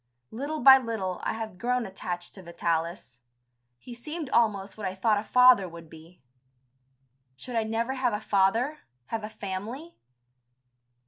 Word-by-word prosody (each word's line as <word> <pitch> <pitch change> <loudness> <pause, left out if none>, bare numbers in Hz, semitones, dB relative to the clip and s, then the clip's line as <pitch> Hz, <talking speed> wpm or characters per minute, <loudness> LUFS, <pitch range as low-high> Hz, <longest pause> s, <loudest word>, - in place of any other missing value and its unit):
Little 285 +6 -4
by 265 +1 +9
little 215 -7 -3
I - - -2
had 220 -4 -6
grown 250 +1 0
attached 175 -2 -6
to 190 - -12
Vitalis. 170 -6 -3 0.6
He 240 - -11
seemed 300 +4 -7
almost 205 -4 +1
what 210 -3 -4
I 185 - -5
thought 210 +2 +2
a - - -5
father 250 -5 +5
would 165 -1 -12
be. 160 0 -15 1.1
Should 245 - -8
I 225 -1 +1
never 230 +3 -1
have 255 -2 0
a 210 - -1
father, 225 +9 +1 0.3
have 225 -1 -3
a 215 - -5
family? 220 - -6
215 Hz, 150 wpm, -27 LUFS, 185-250 Hz, 1.1 s, by